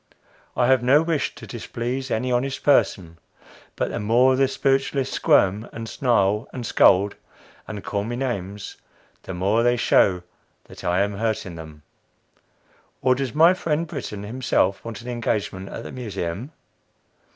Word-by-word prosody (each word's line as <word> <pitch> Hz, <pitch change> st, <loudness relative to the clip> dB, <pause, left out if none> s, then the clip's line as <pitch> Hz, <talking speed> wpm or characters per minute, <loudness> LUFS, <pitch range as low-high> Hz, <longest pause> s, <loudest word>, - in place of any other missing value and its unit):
I 125 Hz, -, +3 dB
have 130 Hz, 0 st, +4 dB
no 135 Hz, +5 st, +4 dB
wish 165 Hz, -4 st, -1 dB
to -, -, -10 dB
displease 125 Hz, +3 st, -4 dB
any 125 Hz, +2 st, -1 dB
honest 130 Hz, +2 st, -1 dB
person; 85 Hz, -, +2 dB, 0.6 s
but -, -, -2 dB
the -, -, -3 dB
more 120 Hz, +5 st, +4 dB
the 135 Hz, +1 st, +3 dB
spiritualists 135 Hz, 0 st, 0 dB
squirm, 100 Hz, +4 st, +2 dB
and 115 Hz, 0 st, -7 dB
snarl, 105 Hz, -4 st, +1 dB
and 125 Hz, -2 st, -6 dB
scold, 100 Hz, -1 st, +4 dB, 0.5 s
and 105 Hz, -2 st, -6 dB
call 100 Hz, -1 st, -2 dB
names, 105 Hz, -5 st, -4 dB, 0.4 s
the 95 Hz, -, -7 dB
more 100 Hz, +6 st, +1 dB
they 120 Hz, +1 st, +3 dB
show 90 Hz, -5 st, +3 dB, 0.4 s
that -, -, -13 dB
I 90 Hz, +2 st, +1 dB
am 100 Hz, 0 st, -1 dB
hurting 110 Hz, -4 st, -2 dB
them. 80 Hz, -2 st, -11 dB, 1.2 s
Or 130 Hz, 0 st, +5 dB
does 130 Hz, -1 st, -3 dB
my 165 Hz, +4 st, +6 dB
friend 165 Hz, -3 st, -1 dB
Brittan 130 Hz, -10 st, -6 dB
himself 105 Hz, -4 st, 0 dB
want 115 Hz, -2 st, -7 dB
an -, -, -10 dB
engagement 105 Hz, -5 st, -2 dB
at 115 Hz, -, -7 dB
the -, -, -8 dB
Museum? 105 Hz, -, -5 dB
115 Hz, 150 wpm, -23 LUFS, 100-130 Hz, 1.2 s, my